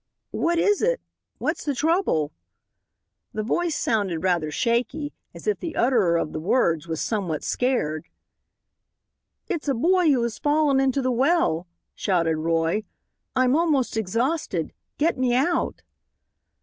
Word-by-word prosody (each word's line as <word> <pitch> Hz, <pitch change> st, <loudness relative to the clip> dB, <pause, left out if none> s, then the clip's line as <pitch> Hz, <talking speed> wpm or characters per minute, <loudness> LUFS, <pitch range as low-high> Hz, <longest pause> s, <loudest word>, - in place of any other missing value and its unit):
"What 340 Hz, +1 st, 0 dB
is 410 Hz, +4 st, +3 dB
it? -, -, +2 dB, 0.4 s
What's 320 Hz, +2 st, -2 dB
the 285 Hz, -2 st, -1 dB
trouble?" 300 Hz, -, +1 dB, 1.0 s
The 215 Hz, -, -2 dB
voice 335 Hz, +8 st, 0 dB
sounded 195 Hz, -7 st, 0 dB
rather 175 Hz, -4 st, +1 dB
shaky, 245 Hz, -, 0 dB
and -, -, -32 dB, 0.2 s
as -, -, -10 dB
if 425 Hz, -, 0 dB
the 335 Hz, -, -5 dB
utterer 220 Hz, -9 st, +3 dB
of 155 Hz, -, -2 dB
the -, -, -3 dB
words 170 Hz, -3 st, +1 dB
was 160 Hz, -1 st, -3 dB
somewhat 185 Hz, -9 st, -2 dB
scared. 200 Hz, -, -1 dB, 1.4 s
"It's 335 Hz, -8 st, -3 dB
a 275 Hz, -, +2 dB
boy 350 Hz, +6 st, +3 dB
who 260 Hz, -5 st, +3 dB
has 235 Hz, -2 st, -3 dB
fallen 290 Hz, -2 st, +3 dB
into 270 Hz, 0 st, +1 dB
the 255 Hz, -, +1 dB
well," 250 Hz, -, +2 dB, 0.3 s
shouted 170 Hz, -5 st, +1 dB
Roy. 165 Hz, +4 st, +1 dB, 0.5 s
"I'm 255 Hz, 0 st, +3 dB
almost 300 Hz, -8 st, +1 dB
exhausted. 225 Hz, -, -1 dB, 0.2 s
Get 310 Hz, -2 st, +1 dB
me 250 Hz, -1 st, +2 dB
out." 330 Hz, +7 st, 0 dB
250 Hz, 140 wpm, -24 LUFS, -, 1.4 s, is